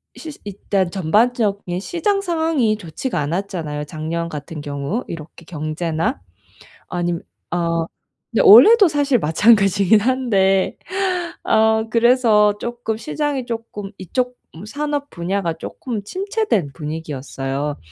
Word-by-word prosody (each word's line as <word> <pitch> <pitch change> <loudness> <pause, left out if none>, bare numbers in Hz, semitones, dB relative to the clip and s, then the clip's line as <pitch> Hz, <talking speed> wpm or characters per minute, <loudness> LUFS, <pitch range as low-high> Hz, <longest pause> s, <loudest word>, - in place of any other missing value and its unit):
이 - - -13
시 325 - -7
일단 195 -2 -2
전반적인 200 0 +1
시장 395 - -1
상황이 320 - +1
좋지가 175 - -4
않았잖아요. 155 -2 -3
작년 160 +3 -4
같은 150 +1 -7
경우 145 - -3
이렇게 165 +1 -9
경제나 160 - -3 0.7
아니며 175 -1 -2 0.3
어 170 -1 0 0.5
근데 - - +2
올해도 430 -1 +9
사실 285 -5 +1
마찬가지긴 200 +4 +4
한데 205 -6 +1 0.7
어 220 0 +3
그래서 230 -4 +4
쪼끔 235 -1 -4
시장이 290 -1 -2
쪼끔 225 -4 -6
이쪽 250 +7 -2 0.3
산업 290 +4 -3
분야가 175 0 -2
쪼끔 230 -5 -5
침체된 380 - -1
분위기였어요. 145 -1 -4
200 Hz, 270 characters per minute, -20 LUFS, 165-250 Hz, 0.7 s, 올해도